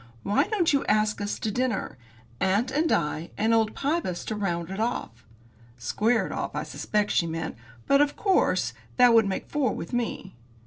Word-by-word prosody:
Why 200 +1 +2
don't 380 -8 +1
you 280 - +2
ask 215 0 +1
us 205 0 -2
to 220 - -2
dinner? 245 - -1 0.4
Aunt 205 +7 +1
and 310 +4 +1
I, 155 +1 0
and 225 +2 +2
old 225 -1 +2
Pybus 280 - -1
to 215 - -3
round 175 -4 -2
it 195 - -5
off." 220 - -3 0.5
Square 220 - +1
it - - -6
off, - - -4
I - - -1
suspect 210 -1 -1
she 170 - +2
meant, 160 0 -4 0.3
because, 275 +1 +5
of 290 0 +2
course, 385 -3 +2 0.2
that 245 -2 +7
would 225 -3 +5
make 190 - -3
four 275 -7 0
with 170 - -7
me. 230 -5 -3
215 Hz, 185 wpm, -26 LUFS, 190-255 Hz, 0.5 s, that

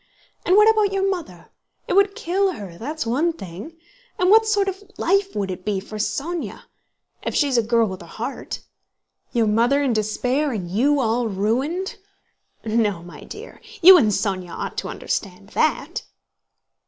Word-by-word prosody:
And 365 - +5
what 425 +1 +7
about 430 -2 +4
your 390 0 +1
mother? 330 - -5 0.4
It - - -1
would 395 0 +4
kill 380 +2 0
her, 195 - -8
that's 295 - -4
one 290 +9 +1
thing. 195 - -9 0.4
And 365 +1 +3
what 445 +1 +6
sort 410 -2 +2
of 385 +1 -3 0.2
life 390 +2 +1
would 200 -2 -1
it 185 0 -7
be 205 -1 -1
for 215 +2 -8
Sónya—if 325 +10 -5
she's 280 -3 +2
a 235 - +5
girl 230 0 +2
with 190 -1 -6
a - - -11
heart? - - -6 0.7
Your 235 -3 +2
mother 235 +7 +3
in 265 -4 +1
despair, 250 +7 0
and 190 -6 -4
you 280 +9 +2
all 235 -1 +1
ruined.... 250 - -1 0.7
No, 215 -5 0
my 170 -4 -11
dear, 425 +3 -10 0.2
you 375 +2 +11
and 280 -11 +5
Sónya 195 -3 -1
ought - - -4
to - - -5
understand - - -4
that." - - 0
255 Hz, 165 wpm, -22 LUFS, -, 0.7 s, you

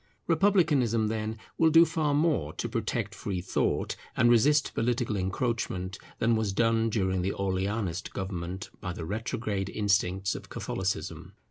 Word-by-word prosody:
Republicanism 155 - +3
then, 110 0 -3 0.2
will 160 - +6
do 165 +2 +7
far 155 -3 0
more 145 - +1
to 120 - -3
protect 115 -2 -2
free 95 -3 -3
thought, 90 - 0 0.2
and 120 +1 +5
resist 145 +6 +4
political 120 -1 0
encroachment, 95 -1 -2 0.2
than 115 0 +2
was 110 -3 0
done 115 +1 +2
during 95 -4 0
the 95 +2 -1
Orleanist 95 -1 -2
government 95 0 -5
by 90 - -4
the 85 - -6
retrograde 105 0 -2
instincts 95 -2 +1
of - - -8
Catholicism. 95 +1 -3
110 Hz, 140 wpm, -29 LUFS, 95-120 Hz, 0.2 s, do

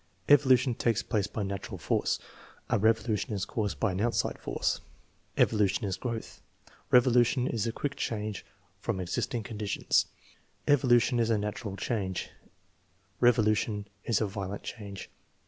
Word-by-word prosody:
"Evolution 130 -3 +5
takes 115 -1 0
place 105 -4 0
by 105 - -4
natural 100 0 -4
force; - - 0 0.5
a - - +3
revolution 110 0 +1
is 100 -1 -1
caused 105 -3 -2
by 115 - +2
an 90 +2 -2
outside 120 +1 0
force." - - -1 0.6
"Evolution 105 -2 +2
is 95 -2 -1
growth; 115 -1 -5 0.5
revolution 125 0 +4
is 115 -3 -1
a - - 0
quick 140 +4 -3
change 105 -2 -3 0.4
from 100 -1 -2
existing 95 +6 -2
conditions." 105 -2 0 0.6
"Evolution 125 -3 +4
is 115 -1 +2
a 110 - +3
natural 105 -1 -4
change; 95 -4 -2 0.9
revolution 110 -3 +2 0.2
is 115 - +1
a 110 - +1
violent 100 0 -5
change." 100 -4 -7
110 Hz, 135 wpm, -29 LUFS, 100-120 Hz, 0.9 s, Evolution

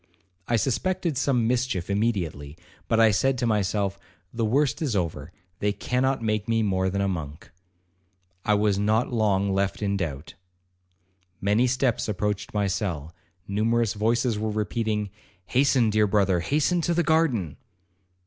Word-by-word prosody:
I 120 - +2
suspected 165 - 0
some 130 -2 +1
mischief 120 -7 -1
immediately, 90 -9 -2 0.3
but 115 - +2
I 110 -1 +6
said 135 +6 +1
to 120 - -1
myself, 100 -2 0 0.3
'The 115 -1 -2
worst 140 +8 +1
is 140 -9 -1
over, 80 -4 -2 0.3
they 105 - +1
cannot 125 +4 -1
make 110 -1 -1
me 115 -1 +2
more 95 -2 +1
than 100 +1 -1
a 100 - +1
monk.'—I 90 +3 -6
was 105 -1 +1
not 110 +4 +1
long 100 -3 +1
left 100 0 0
in 100 -1 0
doubt. 80 -4 -5 1.1
Many 105 +6 +2
steps 125 -3 0
approached 105 0 -2
my 105 -1 0
cell, 90 -6 -3 0.3
numerous 110 +2 +1
voices 115 +1 0
were 110 0 -1
repeating, 105 0 -2 0.3
'Hasten, 130 -1 +3
dear 105 0 +3
brother, 95 -3 +2
hasten 155 - +1
to 170 +1 0
the 175 - +2
garden.' 140 - +1
105 Hz, 145 wpm, -25 LUFS, 95-120 Hz, 1.1 s, I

